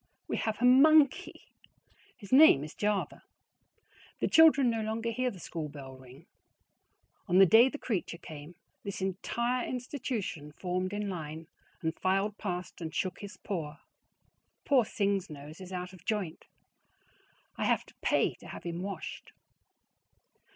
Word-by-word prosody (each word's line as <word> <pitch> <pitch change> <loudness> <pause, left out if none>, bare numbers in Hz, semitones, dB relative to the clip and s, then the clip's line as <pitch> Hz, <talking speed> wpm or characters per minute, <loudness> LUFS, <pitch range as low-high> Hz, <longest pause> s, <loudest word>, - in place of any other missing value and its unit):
WE - - -2
HAVE 220 -2 -2
A - - +4
MONKEY! 280 +2 +5 0.7
His 200 -4 -13
name 265 - +8
is 150 - -8
Java. 210 -1 -1 1.0
The - - +1
children 315 -5 +6
no 225 -1 -2
longer 225 +2 -2
hear 255 +2 0
the 195 - -10
school 160 -2 -5
bell 135 -2 -10
ring. 130 +4 -15 1.0
On 180 -1 +3
the 195 - +9
day 225 +8 +7
the 295 - -6
creature 195 -10 -3
came, 155 +1 -10 0.3
this 200 -1 -5
entire 235 +6 -1
institution 240 - -4
formed 185 +2 -2
in 205 0 -3
line 160 -3 -6 0.4
and 160 0 0
filed 195 +2 0
past 180 -3 -5
and 160 -1 -5
shook 185 -2 -2
his 205 0 -9
paw. 160 -7 -5 0.9
Poor 265 -5 +4
Sing's 200 -3 -1
nose 150 +3 -10
is 185 0 -9
out 180 0 -5
of 185 - -15
joint. 205 -7 -3 1.1
I - - -2
have - - +1
to - - -18
PAY - - +2
to - - -13
have - - -9
him 170 0 -4
washed. 195 -3 -7
195 Hz, 150 wpm, -30 LUFS, 165-225 Hz, 1.1 s, the